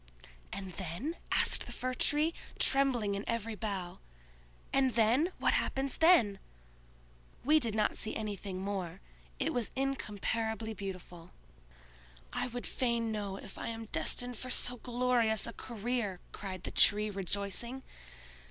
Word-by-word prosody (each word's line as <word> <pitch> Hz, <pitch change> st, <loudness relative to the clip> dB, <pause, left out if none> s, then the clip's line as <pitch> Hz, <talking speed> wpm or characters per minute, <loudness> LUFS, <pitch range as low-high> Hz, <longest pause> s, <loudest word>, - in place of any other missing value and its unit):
"And 190 Hz, -1 st, -5 dB
then?" 190 Hz, -, -3 dB, 0.2 s
asked -, -, +3 dB
the -, -, -6 dB
Fir 255 Hz, 0 st, -2 dB
tree, 300 Hz, +5 st, +3 dB, 0.2 s
trembling 255 Hz, -7 st, +4 dB
in 200 Hz, +1 st, -2 dB
every 230 Hz, -1 st, -1 dB
bough. 195 Hz, -5 st, -4 dB, 0.7 s
"And 265 Hz, -2 st, +4 dB
then? 235 Hz, +9 st, +4 dB
What -, -, +3 dB
happens 270 Hz, 0 st, 0 dB
then?" 250 Hz, -, +6 dB, 1.1 s
"We 305 Hz, +3 st, +6 dB
did 230 Hz, -6 st, -2 dB
not 215 Hz, -1 st, +2 dB
see 215 Hz, -, -1 dB
anything 200 Hz, -3 st, -3 dB
more: 190 Hz, -4 st, -3 dB, 0.4 s
it -, -, 0 dB
was 240 Hz, -4 st, 0 dB
incomparably 225 Hz, -4 st, -1 dB
beautiful." 185 Hz, -4 st, -7 dB, 1.0 s
"I -, -, 0 dB
would 245 Hz, 0 st, -5 dB
fain 235 Hz, -3 st, 0 dB
know 205 Hz, -3 st, -2 dB
if 195 Hz, -, -9 dB
I -, -, -3 dB
am 225 Hz, 0 st, -4 dB
destined 245 Hz, +2 st, 0 dB
for 255 Hz, -, -5 dB
so 250 Hz, 0 st, +1 dB
glorious 240 Hz, -2 st, +2 dB
a 235 Hz, -, -6 dB
career," 230 Hz, -4 st, -2 dB
cried 185 Hz, -3 st, -6 dB
the -, -, -4 dB
Tree, 210 Hz, 0 st, +4 dB
rejoicing. 200 Hz, +6 st, -2 dB
220 Hz, 135 wpm, -33 LUFS, 200-250 Hz, 1.1 s, then